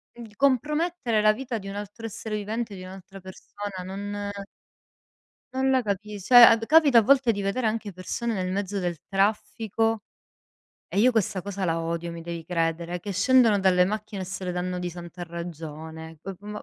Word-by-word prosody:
di 225 -3 -11
compromettere 280 -1 +1
la 215 0 +5
vita 245 0 -4
di 195 -2 -8
un - - -6
altro 205 +3 -7
essere 220 0 -5
vivente, 215 +1 -3
di 185 - -9
un'altra 190 +1 -11
persona, 190 +1 -8
non 205 +2 -5 1.3
non 265 0 +1
la 260 -1 +3
capis 205 -1 -4
cioè 245 -1 +9
ad 225 -1 +5
capita 300 -4 +6
a 225 - +6
volte 260 0 +4
di 205 - -4
vedere 200 +5 -1
anche 215 -1 -2
persone 220 +6 -3
nel 185 -1 -2
mezzo 200 0 -2
del 175 -3 -2
traffico 215 +2 0 0.9
e 200 - -1
io 250 +3 +5
questa 200 -4 0
cosa 200 0 -4
la 165 0 0
odio, 170 +1 -3
mi 170 0 -7
devi 170 -1 -6
credere, 170 +1 -1
che 200 +3 -5
scendono 220 +1 +4
dalle 180 -1 +4
macchine 210 0 -4
e - - -4
se 185 +1 -6
le 180 - -1
danno 180 0 -3
di 180 0 -3
santa 175 +1 -8
ragione. 160 -1 -8
C 195 - -5
ma 210 0 -7
200 Hz, 185 wpm, -26 LUFS, 180-225 Hz, 1.3 s, cioè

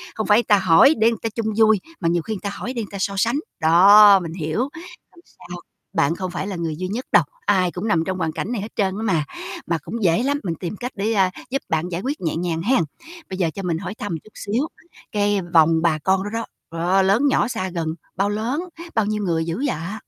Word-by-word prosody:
không 220 - -3
phải 210 +3 +5
ta 205 -3 +4
hỏi 190 - +6
để 225 +1 +4
ta 225 - 0
chung 225 0 -3
vui 220 -2 +5 0.2
mà 165 - +1
nhiều 170 0 +1
khi 215 +4 -4
ta 200 - -3
hỏi 250 - -5
để 235 -3 -3
ta 200 - -6
so 200 +1 -1
sánh. 235 +8 +1 0.2
Đó, 195 +5 +8
mình 165 -3 -6
hiểu, 160 +2 -3
hông 330 +5 -7
sao 180 0 -11 0.4
bạn 155 +4 +2
không 185 0 -4
phải 185 - -4
là 200 - -4
người 165 -3 -3
duy 185 +2 -3
nhất 230 +7 -4
đâu, - - +6 0.2
ai 185 -2 +2
cũng 185 +6 -4
nằm 165 -5 +2
trong 190 +1 -2
hoàn 165 -3 -1
cảnh 215 - -4
này 230 - -2
hết 210 - -7
trơn 190 -3 +1
á 220 - -4
mà. 165 -8 +1 0.4
Mà 170 - +1
cũng 230 -1 -5
dễ 175 +7 +3
lắm 285 +1 0
mình 170 -3 -2
tìm 175 +4 -5
cách 250 +4 -5
để, 210 +3 -1
à, 190 -3 +3 0.2
giúp 270 +2 -1
bạn 160 +2 -1
giải 175 +1 -3
quyết 280 +4 -3
nhẹ 165 -3 -1
nhàng 165 -1 -2
hen. 225 0 +2 0.5
Bây 185 - -5
giờ 175 -4 +1
cho 195 - -5
mình 170 -3 -1
hỏi 195 +4 -6
thăm 205 -7 -4
chút 215 - -18
xíu 235 +10 -2 0.4
cái 205 -1 +1
vòng 160 0 +5
bà 165 -3 +2
con 190 0 +2
đó 205 - -4
đó. 230 0 -2 0.3
Đó, 185 +3 +3
lớn 200 +9 +3
nhỏ 275 - +2
xa 220 -6 -3
gần 170 -3 -3 0.3
bao 200 +2 +1
lớn, 235 +10 -2 0.3
bao 220 - +2
nhiêu 210 0 -2
người 165 -3 0
dữ 170 +11 -3
vậy? 195 - -4
195 Hz, 250 wpm, -22 LUFS, 170-220 Hz, 0.5 s, Đó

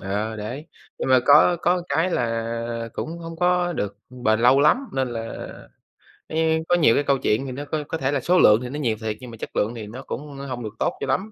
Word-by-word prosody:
ờ, 105 +3 -3
đấy. 120 +9 -6 0.3
Nhưng - - -2
mà 130 -1 +6
có 150 +5 +6
có 180 0 +2
cái 160 +6 +1
là 115 -2 -2
cũng 165 +2 -5
hông 165 0 -8
có 180 0 +2
được 100 -9 -3 0.3
bền 110 -1 +2
lâu 130 +3 +5
lắm, 150 +10 +5 0.2
nên 130 -1 0
là, 115 -1 -5 1.0
ấy, 160 0 +1
có 175 - +5
nhiều 155 -10 +4
cái 145 - +2
câu 140 -1 +2
chuyện 120 +2 0
thì 130 - -5
nó 140 +3 -6
có 150 +1 -3
có 160 - -3
thể 135 -2 -1
là 145 - +1
số 180 +7 +3
lượng 105 -4 +6
thì 125 - -5
nó 145 +3 -5
nhiều 115 -6 0
thiệt 110 -1 -3
nhưng 125 -2 -10
mà 115 - -10
chất - - -8
lượng 110 +3 0
thì 110 -3 -7
nó 125 +5 -8
cũng 145 +1 -7
hông 130 -3 -5
được 105 0 -6
tốt - - +1
cho - - -3
lắm. 215 +3 -1
130 Hz, 250 wpm, -23 LUFS, 115-160 Hz, 1.0 s, mà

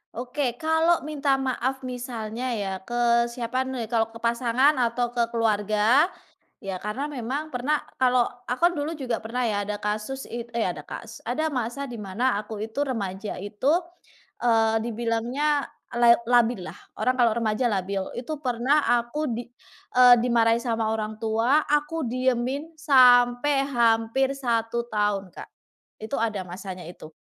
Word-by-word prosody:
Oke, 250 +1 -2
kalau 320 +4 +2
minta 285 -2 0
maaf 265 0 -2
misalnya 245 -2 -5
ya 200 -3 -3
ke 235 0 +2
siapa 245 +2 -3
nih? 245 -4 -5
Kalau 225 -2 +2
ke 225 0 -12
pasangan 235 +4 +3
atau 240 0 0
ke 240 -1 +1
keluarga, 220 - +2 0.5
ya 195 -2 -4
karena 210 +10 -4
memang 280 +2 -4
pernah 285 +2 0 0.2
kalau 250 -1 +3 0.2
aku 255 +8 +2
kan - - -5
dulu 295 +2 -2
juga 260 -7 -2
pernah 240 +2 -1
ya 205 -1 -1
ada 205 0 -4
kasus 215 +6 -3
it 235 0 -7
eh, 230 -4 0
ada 155 -4 -5
kasus. 230 0 -9
Ada 280 +7 -1
masa 265 0 -3
di 240 - -7
mana 210 +4 -1
aku 210 0 -5
itu 225 +7 -2
remaja 205 -7 -4
itu, 210 +8 0 0.7
eee, 225 -2 +3
dibilangnya 240 +6 0 0.3
la 240 0 +7 0.2
labillah, 240 -5 +2 0.2
orang 255 0 +1
kalau 240 -3 +4
remaja 220 +1 0
labil. 195 0 -1
Itu 260 +6 -5
pernah 255 +4 +2 0.2
aku 265 +6 -4
di, 235 +1 -5 0.5
eee, 250 -1 +9
dimarahi 230 -1 +3
sama 225 -2 -1
orang 215 -1 -3
tua, 225 +7 +2
aku 295 +1 0
diemin 255 +5 -1
sampai 260 -1 +5
hampir 235 +3 +2
1 235 -2 -1
tahun, 205 -4 -1
Kak. - - -10 0.5
Itu 220 +6 -4
ada 215 -3 -1
masanya 185 +1 -7
itu, 155 -3 -11
240 Hz, 150 wpm, -25 LUFS, 225-260 Hz, 0.7 s, eee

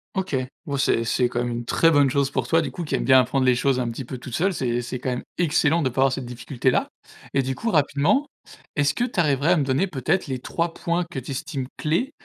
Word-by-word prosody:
OK, 190 -7 -1 0.3
bon 140 - -2
c'est 115 -3 +2
c'est 125 +2 +2
quand 120 0 -2
même 120 - -2
une 120 0 -4
très 165 - +3
bonne 145 -3 +5
chose 140 +1 +1
pour - - -2
toi, 165 0 +3
du 140 - -3
coup, 170 +6 -6
qui 150 - -5
aimes - - +1
bien 130 -1 +6
apprendre 130 +2 +1
les 125 - +5
choses 130 +1 +1
un 120 - -1
petit 115 +2 -6
peu 130 0 -7
toute 125 -2 -6
seule, 190 +3 +1
c'est 120 -5 -1
c'est 125 +1 -5
quand 130 - -3
même 125 - -3 0.2
excellent 165 -1 +2
de 130 - +1
pas 130 +2 -1
avoir 135 -1 +4
cette 135 -1 -4
difficulté-là 125 +1 -1 0.5
et 135 - +3
du 130 0 -3
coup, 230 0 -2
rapidement, 155 - +2 0.5
est-ce 145 -1 +2
que 245 - 0
tu 225 -7 -4
arriverais 150 +1 +3
à 180 - +2
me 145 - +2
donner 135 +8 +1
peut-être 160 +4 -1
les 130 -2 -2
3 165 +6 -2
points 170 +1 -1
que 150 - -8
tu 130 +2 -5
estimes 135 0 -4
clés 175 - 0
135 Hz, 265 wpm, -23 LUFS, 130-165 Hz, 0.5 s, bien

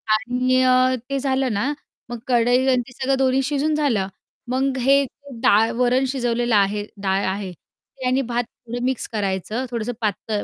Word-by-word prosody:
आणि 250 +2 +1
अ, 255 0 +4
ते 275 - -1
झालं 265 -3 0
ना, 255 +9 0 0.4
मग 240 - -5
कढई 245 +1 +3
आणि 255 -1 +3
ते 250 - -13
सगळं 265 +1 0
दोन्ही 265 0 +2
शिजून 290 +2 0
झालं, 245 -11 +1 0.4
मग 265 +1 0
हे 275 +2 +4 0.4
डाळ, 225 -1 +4
वरण 250 +1 +2
शिजवलेलं 240 -3 0
आहे, 205 +1 +2 0.2
डाळ 195 +1 +1
आहे. 190 0 -3
ते 260 - -14
आणि 255 +2 +2
भात 240 -1 -1
थोडं 240 +1 -8
मिक्स 260 -2 -1
करायचं, 205 +4 -2
थोडंसं 235 0 -3
पातळ 210 0 -2
250 Hz, 165 wpm, -22 LUFS, 220-265 Hz, 0.4 s, अ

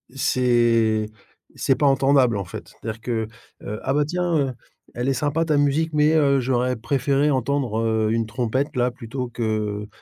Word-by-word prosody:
c'est 120 -4 +2 0.5
c'est 135 - +1
pas 145 - 0
entendable 135 -3 +3
en 100 - -2
fait. 85 - -9
C'est-à-dire 110 0 -7
que, 115 -2 -2 0.4
heu: 105 +2 -5
«Ah - - 0
bah 150 +1 +2
tiens, 175 +2 -1
heu, 135 -3 0 0.4
elle 125 +2 -2
est - - +2
sympa 145 +5 0
ta 155 -2 +1
musique, 145 +3 +1
mais 150 0 +3
heu, 140 -3 +3
j'aurais 125 0 0
préféré 140 +4 +1
entendre, 130 -3 0
heu, 110 -1 +1
une 115 0 0
trompette 130 +6 -2
là, 125 0 +1
plutôt 125 +1 -6
que, 105 -3 -2
125 Hz, 175 wpm, -23 LUFS, 115-140 Hz, 0.5 s, entendable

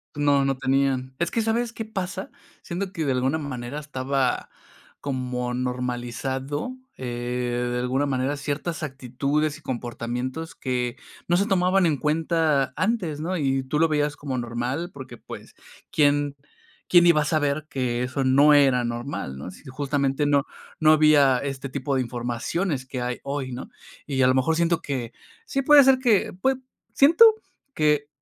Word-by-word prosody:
No, 145 -1 +3
no 135 -1 0
tenían. 130 -1 0
Es 170 - +1
que, 230 - 0
¿sabes 225 +2 0
qué 225 -1 -6
pasa? 190 -2 -5 0.3
Siento 185 +2 -4
que 165 -5 -3
de 140 - +1
alguna 130 +4 +1
manera 140 -2 -5
estaba 135 -3 -1 0.5
como 125 -2 -3
normalizado, 125 - -3 0.2
eh, 120 0 -2
de 125 - -1
alguna 130 +3 0
manera, 135 +1 0
ciertas 150 +3 -3
actitudes 140 +2 -2
y - - -18
comportamientos 125 +4 -4
que 125 -2 -2 0.3
no 175 - +3
se 200 - +2
tomaban 190 -2 +3
en 155 -4 +2
cuenta 155 -2 +1
antes, 185 -8 -1
¿no? 180 +3 -2
Y 135 -3 0
tú 130 +3 -2
lo 165 - +5
veías 150 -1 0
como 140 -3 -4
normal, 120 +7 -3
porque, 135 -2 -10
pues, - - -11 0.4
¿quién 145 -1 +2 0.5
quién 175 -1 +7
iba 170 -3 +5
a - - -1
saber 150 -1 0
que 125 -2 -1
eso 130 +2 -1
no 140 +3 +6
era 135 -4 +4
normal, 120 - -4
no? 70 - -8
Así, 90 - -10
justamente 140 +1 0
no 145 -1 +2 0.3
no 155 -1 +6
había 150 -4 +5
este 135 +1 -4
tipo 140 +1 -3
de 130 - +2
informaciones 125 +6 -2
que 130 -1 -5
hay 125 0 -3
hoy, 140 -2 -3
¿no? 125 +1 -7 0.4
Y 135 -2 +1
a - - +5
lo 130 - +4
mejor 130 +5 +2
siento 170 0 +1
que, 125 -5 -4 0.3
sí 275 - -1
puede 290 +1 +8
ser 265 0 +5
que, 230 -7 +2
pues, 265 0 +2 0.4
siento 320 +11 +7 0.5
que 150 -1 +2
140 Hz, 165 wpm, -24 LUFS, 130-155 Hz, 0.5 s, puede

